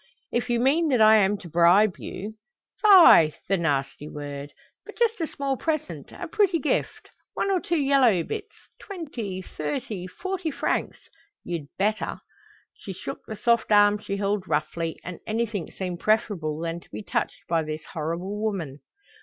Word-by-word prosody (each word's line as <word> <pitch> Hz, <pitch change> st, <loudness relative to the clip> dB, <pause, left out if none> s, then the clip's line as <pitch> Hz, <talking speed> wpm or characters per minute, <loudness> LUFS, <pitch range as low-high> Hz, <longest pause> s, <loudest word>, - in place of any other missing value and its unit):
"If 240 Hz, +1 st, -1 dB
you 240 Hz, -1 st, +2 dB
mean 295 Hz, +7 st, +3 dB
that 260 Hz, -5 st, +2 dB
I 220 Hz, 0 st, +7 dB
am 205 Hz, 0 st, +3 dB
to 185 Hz, -, -11 dB
bribe 175 Hz, +5 st, +4 dB
you 210 Hz, +3 st, -6 dB, 0.2 s
" -, -, -41 dB
"Fie, 350 Hz, -, +8 dB
the 195 Hz, -, +2 dB
nasty 145 Hz, -4 st, -1 dB
word! 145 Hz, -1 st, -7 dB, 0.3 s
But -, -, -12 dB
just 455 Hz, -5 st, +1 dB
a 325 Hz, -, 0 dB
small 275 Hz, -2 st, -3 dB
present, 310 Hz, +1 st, -3 dB
a -, -, -7 dB
pretty 395 Hz, -5 st, +2 dB
gift, 300 Hz, -1 st, -2 dB, 0.2 s
one 395 Hz, -, 0 dB
or 375 Hz, -, +2 dB
two 340 Hz, 0 st, -1 dB
yellow 270 Hz, -, +3 dB
bits, 420 Hz, -, -6 dB, 0.2 s
twenty, 245 Hz, -, -6 dB
thirty, 180 Hz, -, -4 dB
forty 370 Hz, -, -4 dB
francs 290 Hz, -, -2 dB, 0.4 s
you'd 165 Hz, -5 st, -5 dB
better." 215 Hz, +2 st, -1 dB, 0.5 s
She -, -, -8 dB
shook -, -, -7 dB
the 220 Hz, -, -6 dB
soft 235 Hz, 0 st, +1 dB
arm 205 Hz, 0 st, +5 dB
she 200 Hz, -1 st, -4 dB
held 200 Hz, -1 st, -1 dB
roughly, 160 Hz, +2 st, -2 dB
and 180 Hz, -2 st, -7 dB
anything 220 Hz, -4 st, -2 dB
seemed 180 Hz, -2 st, -5 dB
preferable 195 Hz, -8 st, 0 dB
than 165 Hz, +1 st, -3 dB
to -, -, -22 dB
be -, -, -7 dB
touched -, -, -2 dB
by 165 Hz, -1 st, +1 dB
this 155 Hz, 0 st, -5 dB
horrible 170 Hz, +6 st, -3 dB
woman. 175 Hz, -10 st, -3 dB
205 Hz, 165 wpm, -25 LUFS, 170-270 Hz, 0.5 s, Fie